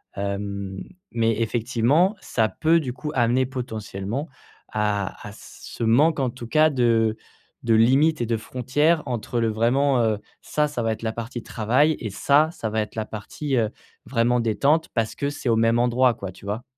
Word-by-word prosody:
Hem, 100 -1 -4 0.3
mais 115 -1 +1
effectivement, 125 - +2
ça 110 -2 0
peut 165 +1 +2
du 130 -6 -4
coup 140 +4 -5
amener 125 +1 +2
potentiellement 120 - -5 0.4
à 105 -2 -2
à - - -8
ce 110 - -9
manque 140 +8 +3
en 130 -2 +1
tout 120 0 -9
cas 155 +5 +4
de 115 -5 +2 0.5
de 115 -1 +3
limites 135 +7 +4
et - - +1
de 115 0 0
frontières 140 +8 0
entre 120 0 -2
le 115 - +2
vraiment, 125 +5 +2
heu, 110 -2 +1 0.2
ça, 150 0 0
ça 145 -5 -4
va 115 - +1
être 110 - -10
la 110 -1 -1
partie 115 0 -6
travail 130 +8 +2
et 110 - -4
ça, 145 +9 +3
ça 115 -10 -4
va 110 0 0
être 105 - -6
la 110 -1 -2
partie, 130 +7 -4
heu, 115 -3 +2 0.4
vraiment 120 0 +2
détente 140 +8 +1
parce 115 -2 0
que 140 - -2
c'est 145 -2 -6
au 115 - +4
même 115 +1 +3
endroit 120 0 +3
quoi, 100 -4 -6
tu 95 - -15
vois? 105 +4 -3
120 Hz, 185 wpm, -24 LUFS, 110-135 Hz, 0.5 s, cas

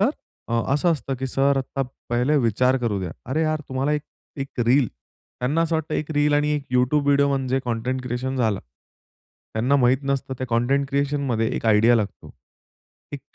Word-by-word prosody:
तर 215 +7 +4 0.4
अ, 115 0 +1
असं 170 +4 +3
असतं, 140 -3 -3
की 135 - -2
"सर, 135 +2 +2
आता 135 +1 -2 0.3
पहिले 125 +5 +2
विचार 125 +2 +2
करू 110 -5 -1
द्या?" 90 -3 -4 0.2
अरे 155 +4 +1
यार! 155 -1 0
तुम्हाला 135 +3 0
एक, 150 -1 -1 0.3
एक 135 -2 -5
रील 130 +2 +4
त्यांना 125 - -4
असं 165 0 0
वाटतं, 160 -1 -3
एक 155 - -2
रील 145 0 +2
आणि 150 0 +2
एक 145 -2 -3
YouTube 130 +4 +3
व्हिडिओ 140 0 +4
म्हणजे 135 -1 0
कंटेंट 125 +2 -2
क्रिएशन 125 +2 -3
झालं. 110 -6 +1 0.9
त्यांना 125 +6 +2
माहीत 125 -1 +4
नसतं 135 -1 -2
त्या 130 - -3
कंटेंट 135 +4 +1
क्रिएशनमध्ये 140 -5 0
एक - - -5
आयडिया 110 +2 +5
लागतो. 105 -3 -4 0.8
एक - - -5
135 Hz, 180 wpm, -23 LUFS, 120-145 Hz, 0.9 s, आयडिया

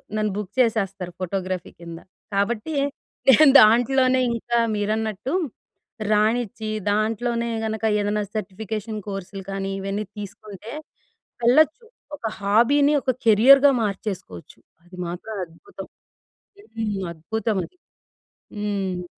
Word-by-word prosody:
నన్ను 215 -1 0
బుక్ 210 -2 -5
చేసేస్తారు 195 -6 0
ఫోటోగ్రఫీ 185 -1 -3
కింద. 170 -1 -9 0.3
కాబట్టి 215 +9 -1 0.5
నేను 275 +3 +8
దాంట్లోనే 255 +4 +4
ఇంకా 235 +1 -1 0.2
మీరన్నట్టు 215 - -2 0.8
రానిచ్చి 220 +1 +1 0.2
దాంట్లోనే 230 +3 0 0.2
గనక 220 0 -4 0.2
ఏదన్నా 205 +1 0
సర్టిఫికేషన్ 215 +2 -4
కోర్సులు 195 0 -6
కానీ 195 0 -3
ఇవన్నీ 195 +2 -3
తీసుకుంటే 205 +1 -9 0.7
వెళ్ళొచ్చు 310 - +4 0.3
ఒక 245 - -9
హాబీని 240 +9 +3
ఒక 260 - +1
కెరియర్‌గా 270 +6 +7
మార్చేసుకోవచ్చు. 190 - -5 0.2
అది 180 +1 -15
మాత్రం 180 +6 -6
అద్భుతం. 170 - -12 0.9
హ్మ్, 210 -3 -2
అద్భుతం 215 +6 -3
అది. 365 - -14 0.8
హ్మ్. 195 -4 -2
215 Hz, 100 wpm, -23 LUFS, 195-235 Hz, 0.9 s, నేను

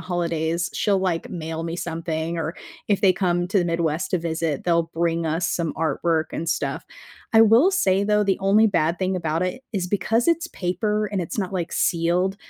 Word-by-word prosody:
holidays, 170 -1 -1
she'll, 200 -2 +1
like, 180 -3 -2
mail 160 -1 -5
me 165 0 -4
something 165 -1 -3
or 165 +1 -3 0.3
if 205 -2 +2
they 195 -3 +5
come 175 -2 0
to 200 - +2
the - - 0
Midwest 170 +1 -1
to 185 - +1
visit, 165 -3 -2
they'll 170 -1 +1
bring 165 0 0
us 165 +2 0
some 165 -2 -1
artwork 160 +1 0
and 165 - -3
stuff. - - -2 0.5
I 225 - +7
will 230 - +5
say 195 - +2
though, 210 0 +2
the 195 -1 +1
only 200 +3 +4
bad 170 -4 +1
thing 190 0 0
about 165 -2 -1
it 185 +8 -3
is 190 -4 -1
because 215 +5 0
it's 335 0 +1
paper 210 +3 -1
and 195 - 0
it's 170 - -6
not, 195 -2 -2
like, 175 -3 -3
sealed, 175 +3 +1
175 Hz, 195 wpm, -23 LUFS, 165-195 Hz, 0.5 s, I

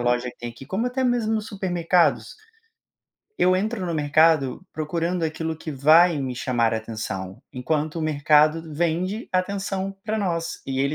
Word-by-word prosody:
loja 120 +1 +1
que - - -10
tem 120 - -5
aqui, 120 +3 -13
como 200 +9 -1
até 255 +1 -1
mesmo 225 -3 +1
supermercados. 180 -4 0 1.0
Eu 185 +1 +4
entro 205 +1 -1
no 170 - -2
mercado 155 0 +2
procurando 165 +3 -2
aquilo 160 0 -2
que 160 0 -7
vai 155 +5 +5
me 130 -2 -3
chamar 120 -2 0
atenção, 110 -4 -5
enquanto 150 +4 -2
o 165 - -2
mercado 155 +1 +3
vende 175 +7 -1
atenção 195 +1 -2
para 215 +1 -2
nós, 170 -5 -2
e 135 -1 -2
ele 140 +2 +1
160 Hz, 155 wpm, -24 LUFS, 140-185 Hz, 1.0 s, vai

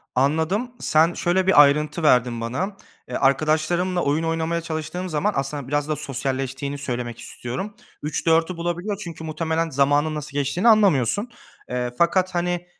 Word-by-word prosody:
Anladım. 160 - +1
Sen 160 +2 +3
şöyle 185 +2 +1
bir 160 -6 +8
ayrıntı 150 +3 +1
verdin 125 -5 +3
bana; 180 - -3 0.3
eee, - - -6
arkadaşlarımla 155 +6 +1
oyun 150 +3 0
oynamaya 165 +1 -1
çalıştığım 165 +2 -4
zaman 175 +7 0
aslında 135 -1 -3
biraz 145 +1 0
da 155 - 0
sosyalleştiğini 135 0 -3
söylemek 120 -4 -4
istiyorum 135 - -5 0.3
03.00-04.00 165 +2 +1
bulabiliyor. 175 +4 -3
Çünkü 170 -5 -8
muhtemelen 160 +1 -1
zamanın 145 +3 +2
nasıl 150 -1 -6
geçtiğini 175 - +1
anlamıyorsun. 205 - +3 0.4
Eee, 125 -1 -2
fakat, 185 +1 +2
hani, 175 0 -1
155 Hz, 140 wpm, -23 LUFS, 140-175 Hz, 0.4 s, bir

